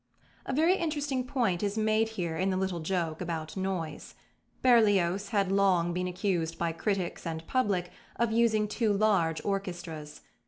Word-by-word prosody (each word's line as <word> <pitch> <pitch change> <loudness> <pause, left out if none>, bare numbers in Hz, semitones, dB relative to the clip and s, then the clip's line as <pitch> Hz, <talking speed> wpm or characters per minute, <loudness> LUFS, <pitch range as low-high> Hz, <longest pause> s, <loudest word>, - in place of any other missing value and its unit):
A - - -1
very 325 +7 +3
interesting 290 -5 -1
point 235 -10 0
is 205 +1 -1
made 220 +1 +2
here 170 -3 -2
in 185 +4 0
the 185 - 0
little 190 -2 -1
joke 165 -1 -2
about 160 -3 -4
"noise." 185 -5 -4 0.5
Berlioz 205 -6 +4
had 200 -4 +1
long 185 -3 +3
been 180 +1 -1
accused 180 -3 -1
by 170 -1 0
critics 185 +1 -2
and 160 0 -4
public 200 -8 0 0.2
of 235 -1 0
using 220 -2 +3
too 215 +1 0
large 195 -6 +2
orchestras. 175 -6 -4
195 Hz, 155 wpm, -29 LUFS, 170-215 Hz, 0.5 s, Berlioz